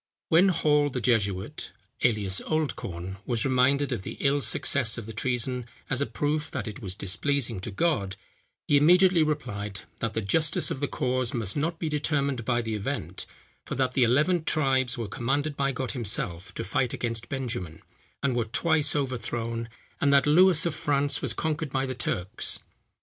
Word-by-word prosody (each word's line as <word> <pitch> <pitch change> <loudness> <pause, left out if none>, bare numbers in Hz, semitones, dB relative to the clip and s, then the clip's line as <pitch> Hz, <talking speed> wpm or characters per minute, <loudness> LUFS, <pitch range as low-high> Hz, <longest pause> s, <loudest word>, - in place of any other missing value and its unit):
When 170 +4 +6
Hall 150 -5 +3
the 130 - -3
jesuit, 100 -6 -1 0.3
alias 105 -5 +2
Oldcorne, 95 - -3
was 120 -3 0
reminded 135 +2 +2
of - - -2
the - - -7
ill 140 +1 +2
success 120 0 +2
of 115 - -6
the 115 - -8
treason 125 +1 -1 0.2
as 135 +1 +1
a 140 - +1
proof 150 +1 -1
that 130 -6 -4
it 105 - -7
was 95 -3 -3
displeasing 115 +3 -1
to 95 - -6
God, 100 - 0 0.5
he 145 - +5
immediately 180 +3 +5
replied, 110 -10 -2 0.2
that 115 -1 -2
the 110 - 0
justice 150 +9 +2
of - - -3
the 145 - 0
cause 130 -4 -1
must 110 -4 -2
not 160 +3 -1
be 165 - -3
determined 140 -4 0
by 120 -1 +1
the 110 -1 -3
event, 105 -1 -4 0.4
for - - -5
that 130 -1 0
the 130 - +1
eleven 150 +9 +3
tribes 135 -6 +1
were 115 -2 -3
commanded 140 +8 -1
by 140 0 0
God 130 -1 -3
himself 105 - -1
to - - -3
fight 120 +6 0
against 115 -1 -3
Benjamin, 115 - -4 0.4
and 135 -3 +1
were 120 -2 +1
twice 150 +5 +2
overthrown; 115 -4 -2 0.3
and 140 - +3
that 140 0 +5
Lewis 170 +2 +5
of 170 - 0
France 145 -1 +1
was - - -1
conquered 155 -2 -2
by 135 0 0
the 130 - -3
Turks. 100 -5 -2
130 Hz, 175 wpm, -27 LUFS, 115-145 Hz, 0.5 s, When